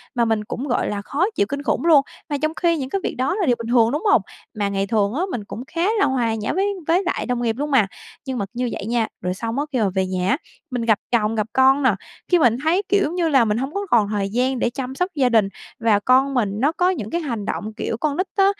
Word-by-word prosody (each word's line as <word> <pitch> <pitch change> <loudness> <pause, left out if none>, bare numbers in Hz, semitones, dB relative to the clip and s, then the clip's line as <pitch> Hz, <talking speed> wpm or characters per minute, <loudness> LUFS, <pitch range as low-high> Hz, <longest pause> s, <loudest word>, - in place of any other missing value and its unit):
mà 235 -1 +2
mình 220 -2 0
cũng 245 +6 -5
gọi 245 - 0
là 205 -1 -3
khó 285 - 0
chịu - - +2
kinh 280 0 -3
khủng 295 - 0
luôn. 315 -4 +7 0.3
Mà 290 - 0
trong 310 0 0
khi 335 -1 +1
những 265 -3 -4
cái 390 - -2
việc - - -2
đó 265 +7 0
là 395 -3 0
điều 250 -5 +3
bình 230 - -5
thường, 235 -2 +4
đúng 295 +3 -2
hông? - - +5 0.4
Mà 200 -1 +1
ngày 195 0 -1
thường 205 -1 +1
á 300 - -1
mình 230 - -3
cũng 225 +3 -7
khá 330 - -4 0.2
là - - +4
hòa 240 -4 0
nhã 215 -1 -2
với 395 +4 +1
với 350 +4 +3
lại 360 - -2
đồng 245 -1 -1
nghiệp 230 -2 0
luôn 295 +1 -2
mà, 250 -8 +4 0.4
nhưng 260 -2 -3
mà 200 - -1
như 245 0 -1
vậy - - -5
nha. 230 0 0
Rồi 180 0 -1
xong 230 +6 -3
á 290 - 0
khi 260 - 0
mà 210 -3 +2
về 190 0 +2
nhà 185 0 -1
á, 260 - +3 0.3
mình 250 -1 -2
gặp 220 -3 +3
chồng 225 -2 +2
gặp 215 -1 -1
con 265 +2 +4
nè, 250 -6 +4 0.4
khi 355 - +5
mình 240 -6 +4
thấy, 340 +5 +2
kiểu, 395 +1 +3
giống 320 - -2
như 340 -2 +1
là 270 -6 +4
mình 210 0 0
hông 270 +5 -3
có 400 0 -2
còn 215 -7 +3
thời 205 -2 -1
gian 250 +4 0
để 235 - +1
chăm 260 +1 -5
sóc 360 +5 0
gia 265 -4 +3
đình, 220 -4 +4 0.3
và 225 -3 +3
con 260 +5 +3
mình 235 -6 +1
nó 280 +6 +3
có 355 +2 +2
những 240 - -3
cái 340 - -1
hành 235 -9 -4
động 215 +1 -4
kiểu 220 - -2
con 290 +3 -1
nít 370 +2 0
á, 390 -1 +4
250 Hz, 290 wpm, -21 LUFS, 220-295 Hz, 0.4 s, luôn